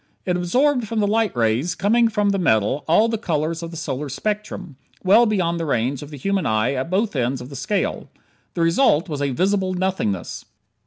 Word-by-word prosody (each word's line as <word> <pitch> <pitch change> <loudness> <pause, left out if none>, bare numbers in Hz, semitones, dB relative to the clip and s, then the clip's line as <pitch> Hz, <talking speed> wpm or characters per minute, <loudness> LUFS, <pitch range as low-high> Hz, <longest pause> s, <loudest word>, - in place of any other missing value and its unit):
It 180 - 0
absorbed 245 +8 +1
from 225 +1 -2
the 210 - +2
light 220 - +1
rays 120 +9 +1
coming 230 +4 +3
from 210 -2 +1
the 195 - 0
metal, 120 - +1
all 190 +8 +4
the 225 -1 -2
colors 165 -3 -2
of 165 - -5
the 165 - -8
solar 150 -3 -4
spectrum, 205 -3 -4 0.3
well 215 +5 +5
beyond 175 -5 0
the 165 - -2
range 130 +1 0
of 145 - -9
the 150 - -9
human 195 +3 -1
eye 110 +4 +1
at 135 +3 -3
both 200 +1 0
ends 130 0 0
of 125 +1 -9
the - - -8
scale. 135 +10 -2 0.5
The 170 - -1
result 165 - +3
was 150 -4 -4
a 140 - +1
"visible 185 +6 0
nothingness." 180 - -2
170 Hz, 205 wpm, -21 LUFS, 140-205 Hz, 0.5 s, well